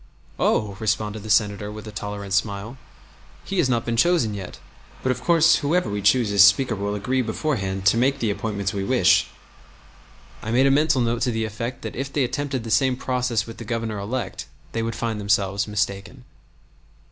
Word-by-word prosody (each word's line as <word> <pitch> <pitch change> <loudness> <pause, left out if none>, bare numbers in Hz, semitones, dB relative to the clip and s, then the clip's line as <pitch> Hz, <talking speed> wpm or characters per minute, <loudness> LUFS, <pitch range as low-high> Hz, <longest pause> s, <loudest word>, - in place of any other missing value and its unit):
"Oh!" 100 -3 +1
responded 110 -1 -1
the 110 - -9
Senator, 105 -1 +1
with 110 +1 -9
a - - -7
tolerant 105 -2 -5
smile, 100 +4 -1 0.7
"He 195 -1 -2
has 145 -7 +2
not 120 -2 0
been 115 -1 -1
chosen 125 -6 +3
yet, 95 -3 -7 0.5
but 130 - +2
of 125 - -3
course 165 -1 +5
whoever 160 - 0
we 100 0 -2
choose 105 +2 +3
as 100 -1 +7
Speaker 110 +4 +4
will 100 +1 -3
agree 125 +6 0
beforehand 110 -6 -2
to 100 +3 +5
make 135 +3 +2
the 115 -6 0
appointments 100 -2 -3
we 100 -1 -2
wish." 100 -4 +3 1.1
I 110 - -6
made 125 +4 +3
a 135 - +4
mental 145 -2 +3
note 115 0 0
to 125 - +1
the 110 -1 -1
effect 115 +4 -5
that 110 - -6
if 135 +2 -4
they 145 -1 +1
attempted 135 -1 -2
the 115 - -6
same 130 +4 +3
process 125 -4 -1
with 115 - -10
the - - -7
Governor 115 -2 -3
elect 110 +2 -4 0.2
they 115 - -2
would 115 0 -3
find 115 -1 -3
themselves 100 0 +1
mistaken. 105 +4 -3
110 Hz, 195 wpm, -23 LUFS, 100-130 Hz, 1.1 s, as